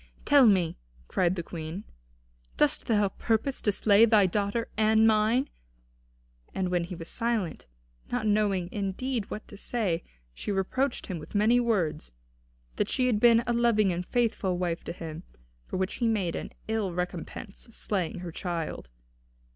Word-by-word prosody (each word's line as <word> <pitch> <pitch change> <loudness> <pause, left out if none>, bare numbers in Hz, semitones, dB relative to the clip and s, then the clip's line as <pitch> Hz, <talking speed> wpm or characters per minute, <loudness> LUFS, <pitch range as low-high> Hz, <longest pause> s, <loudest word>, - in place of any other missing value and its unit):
"Tell 285 -4 +7
me," 185 - +2 0.3
cried 180 0 +1
the 170 - -3
Queen, 165 +3 -6 0.7
"dost - - +2
thou 210 -3 +3
purpose 230 +7 -1
to 210 - +2
slay 205 +2 +5
thy 215 -3 +5
daughter 205 +4 -1
and 220 0 +4
mine?" 220 +4 +3 1.1
And 185 -1 0
when 175 -1 0
he 180 - -7
was 165 -1 -8
silent, 230 -6 -2 0.4
not 245 -3 -1
knowing, 205 -4 +2
indeed, 210 +3 -2
what 215 - -6
to 205 - -11
say, 195 -7 -1 0.3
she 205 - -4
reproached 230 +8 -1
him 180 -4 -5
with 150 - -11
many 220 +4 +4
words, 175 - 0 0.6
that - - 0
she 255 - +1
had 235 -5 +2
been 235 0 +6
a 240 - 0
loving 230 -4 +3
and 175 +1 -3
faithful 215 -5 0
wife 175 -1 -2
to - - -4
him, 165 -2 -7 0.5
for - - -3
which 190 +1 -2
he 235 - +1
made 195 -7 0
an - - -5 0.2
ill 220 -4 -1
recompense 180 +4 -5
slaying 185 -6 -2
her 175 -2 -6
child. 165 - -4
205 Hz, 160 wpm, -28 LUFS, 180-225 Hz, 1.1 s, Tell